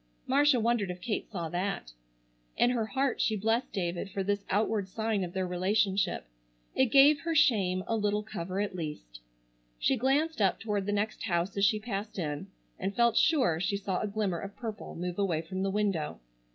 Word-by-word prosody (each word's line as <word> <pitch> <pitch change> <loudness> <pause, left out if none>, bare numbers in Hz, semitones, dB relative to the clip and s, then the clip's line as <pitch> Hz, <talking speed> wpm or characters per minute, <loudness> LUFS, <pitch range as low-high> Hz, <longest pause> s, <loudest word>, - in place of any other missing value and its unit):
Marcia 280 0 +4
wondered 230 -3 +1
if 180 0 -5
Kate 210 +3 -3
saw 175 -6 -4
that. 175 - -3 0.7
In 245 - +4
her 230 -3 0
heart 270 +2 0
she 220 - +2
blessed 225 +5 0
David 175 0 -2
for 195 0 -2
this 200 +1 -1
outward 205 -1 0
sign 220 -1 -1
of 175 -1 -5
their 190 -1 -1
relationship. 190 - +1 0.5
It 260 - +4
gave 280 +4 +6
her 330 +2 -2
shame 190 -10 +3
a 225 - 0
little 210 -1 0
cover 190 -3 -4
at 205 -1 -1
least. 150 - -6 0.6
She 270 - +2
glanced 280 +3 +1
up 195 -2 +3
toward 205 -3 -2
the - - +1
next 205 +1 -1
house 175 -1 0
as 200 0 +3
she 215 +1 +3
passed 210 -1 -5
in 150 -5 -3 0.3
and 195 +1 -2
felt 235 -1 +3
sure 250 - +3
she 200 +3 0
saw 195 -2 -2
a - - -1
glimmer 200 -4 -1
of 195 +3 -7
purple 225 -3 -6
move 175 +2 -4
away 170 -5 0
from 185 +3 -4
the 195 - +1
window. 195 -6 -1
200 Hz, 190 wpm, -30 LUFS, 185-225 Hz, 0.7 s, gave